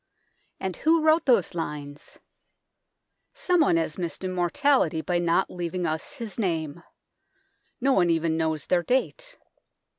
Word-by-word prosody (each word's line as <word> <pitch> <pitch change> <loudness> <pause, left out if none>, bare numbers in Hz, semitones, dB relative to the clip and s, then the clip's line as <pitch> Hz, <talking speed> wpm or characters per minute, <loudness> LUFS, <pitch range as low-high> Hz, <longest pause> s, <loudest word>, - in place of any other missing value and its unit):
And 190 -3 -4
who 320 0 +2
wrote 315 0 +3
those 230 -9 +3
lines? 150 -3 -6 1.2
Someone 355 - +2
has 165 +1 -2
missed 175 +1 -5
immortality 185 - +1
by 175 +1 -1
not 170 +2 +1
leaving 175 0 -3
us 155 -1 -3
his 230 -5 -7
name. 165 -5 -2 1.0
No 270 +1 +2
one 175 -6 +3
even 165 -1 +1
knows 160 -2 -1
their 180 -1 +2
date. - - -2
175 Hz, 125 wpm, -25 LUFS, 165-260 Hz, 1.2 s, wrote